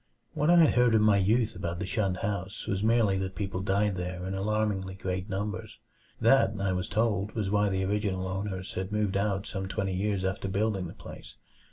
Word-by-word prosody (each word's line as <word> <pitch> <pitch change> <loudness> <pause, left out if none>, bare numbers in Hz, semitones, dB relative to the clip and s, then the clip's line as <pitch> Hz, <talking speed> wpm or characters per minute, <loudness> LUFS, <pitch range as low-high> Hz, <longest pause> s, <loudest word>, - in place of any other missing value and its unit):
What 150 +2 +1
I 175 -2 +7
heard 125 -5 +4
in 110 - +4
my 105 -2 +5
youth 110 +4 +2
about 85 0 -3
the 100 - -3
shunned 95 -1 0
house 100 -1 -4
was 100 -1 -1
merely 110 -3 +3
that 95 0 -4
people 95 -2 -3
died 100 0 +1
there 90 0 -4
in 95 - -3
alarmingly 100 -1 -1
great 95 +1 -4
numbers. 100 +2 -4 0.4
That, 115 -3 +4
I 100 -1 0
was 90 0 -2
told, 105 -2 0
was 105 -4 -2
why 105 0 +3
the 95 0 0
original 95 -2 -1
owners 95 0 -4
had 95 +2 -4
moved 105 -2 0
out 100 -1 0
some 95 -1 -4
twenty 95 0 -2
years 100 0 -1
after 95 +1 -2
building 100 -1 0
the - - -10
place. - - -11
100 Hz, 200 wpm, -29 LUFS, 95-105 Hz, 0.4 s, I